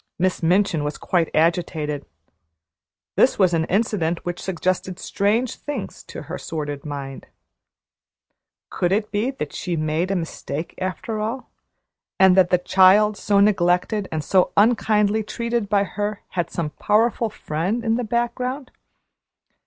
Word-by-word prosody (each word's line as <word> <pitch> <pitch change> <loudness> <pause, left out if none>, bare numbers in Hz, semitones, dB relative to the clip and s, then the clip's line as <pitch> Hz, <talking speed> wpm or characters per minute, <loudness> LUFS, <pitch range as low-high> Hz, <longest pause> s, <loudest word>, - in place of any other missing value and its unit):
Miss 185 +1 0
Minchin 175 -1 +2
was 150 +1 -3
quite 170 -3 0
agitated. 155 - 0 1.1
This - - +4
was 185 -3 +3
an 160 -1 +1
incident 180 -5 0
which 175 0 -4
suggested 185 0 -2
strange 215 +6 0
things 285 -8 -6
to - - -8
her 165 +5 -6
sordid 145 -3 -5
mind. 140 -2 -7 1.4
Could 175 - 0
it 210 +2 0
be 215 +5 0
that 255 - -5
she - - -6
had 165 - -1
made 155 +4 0
a 195 - 0
mistake 165 -2 -4
after 185 +4 -3
all, 225 +5 -4 0.7
and 190 -1 +6
that 185 -2 +5
the 180 - +4
child 190 +4 +5
so 200 0 +1
neglected 195 0 +2
and 155 -1 -2
so 185 +4 +2
unkindly 215 -1 +3
treated 235 0 -2
by 200 -1 +3
her 205 +1 -4
had 175 -2 -2
some 160 -3 -3
powerful 225 - +1
friend 195 +6 -3
in 225 - +2
the 245 +2 0
background? 245 +4 -2
190 Hz, 145 wpm, -22 LUFS, 170-215 Hz, 1.4 s, and